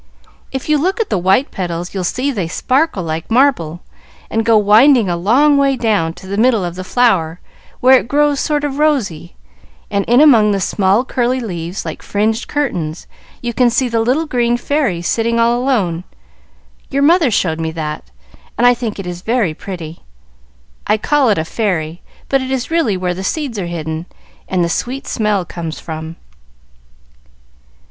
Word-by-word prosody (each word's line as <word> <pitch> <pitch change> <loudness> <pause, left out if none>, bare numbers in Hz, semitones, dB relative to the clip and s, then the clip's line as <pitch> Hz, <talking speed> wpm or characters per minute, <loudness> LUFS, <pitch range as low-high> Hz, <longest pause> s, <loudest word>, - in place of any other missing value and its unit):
"If 265 -1 -5
you 305 -1 +2
look 375 +8 0
at 455 - -2
the 200 - +1
white 190 - +2
petals 175 -1 -4
you'll 190 -2 -3
see 255 +10 -1
that - - -8
they 185 -6 -2
sparkle 260 - 0
like 160 0 -4
marble, 225 - +2 0.5
and 225 - 0
go 225 -1 +4
winding 220 +3 +5
a 175 - 0
long 260 +12 +3
way 275 -1 +2
down 210 -9 0
to 190 - -14
the 200 +2 -3
middle 225 -5 +3
of 175 - -4
the 185 +1 -6
flower 185 -7 +1 0.4
where 260 +1 +6
it - - -8
grows 290 +1 +2
sort 295 -1 0
of 285 -1 -3
rosy; 215 - 0 0.6
and 200 -1 +1
in 240 +2 +4
among 230 -9 +6
the 200 - 0
small, 195 +5 +1
curly 250 0 0
leaves, 180 -5 -5
like - - -6
fringed 220 +3 -1
curtains, 180 - -3 0.4
you 240 0 -2
can 245 +1 +3
see 255 +2 +1
the 230 -1 0
little 255 +8 +1
green 240 -4 0
fairy 240 - -1
sitting 230 +5 0
all 235 +1 +3
alone. 195 -11 0 0.9
Your 280 0 0
mother 325 -1 +4
showed 165 -7 0
me 160 0 -2
that, 150 - -5 0.5
and 240 - +2
I 245 - +7
think 235 -3 -4
it 195 - -6
is 175 0 -6
very 220 -6 0
pretty. 170 -2 -8 0.9
I 210 - +3
call 280 +3 +2
it 205 - +2
a 160 - -1
'fairy,' 175 -5 -2 0.3
but 270 -1 +1
it 260 - -5
is 265 +2 -3
really 280 - +1
where 180 -1 -1
the 190 +2 -6
seeds 265 -2 -3
are 180 - -3
hidden 160 0 -5 0.4
and 185 -2 0
the - - +1
sweet 250 +10 -3
smell 210 -5 0
comes 165 -2 -6
from." 160 0 -7
220 Hz, 185 wpm, -16 LUFS, 175-260 Hz, 0.9 s, I